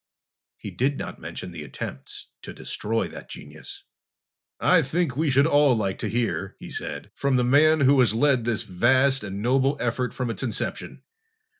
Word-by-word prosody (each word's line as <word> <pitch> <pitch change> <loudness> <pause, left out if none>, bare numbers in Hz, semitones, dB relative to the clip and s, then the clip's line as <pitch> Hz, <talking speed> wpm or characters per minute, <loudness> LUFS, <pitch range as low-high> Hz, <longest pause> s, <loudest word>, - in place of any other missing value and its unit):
He - - -8
did 135 +3 0
not - - -6
mention 90 - -7
the 85 -3 -8
attempts 65 -1 -8
to - - -9
destroy 115 +2 -2
that - - -11
genius. - - -10 0.8
"I - - +4
think 155 0 -1
we 155 +2 +1
should 140 +2 +4
all 145 -4 +4
like 100 -4 -2
to 110 - -2
hear," 115 +2 -2
he - - -10
said, - - -6
"from 140 -1 0
the 125 - +3
man 150 +5 +4
who 140 0 +5
has 115 -4 +3
led 130 -1 +3
this 115 -2 -1
vast 130 +8 +2
and 100 0 -5
noble 135 +3 +2
effort 125 0 -1
from 125 -3 -3
its 110 - -5
inception. 115 -5 -4
125 Hz, 175 wpm, -25 LUFS, 110-140 Hz, 0.8 s, who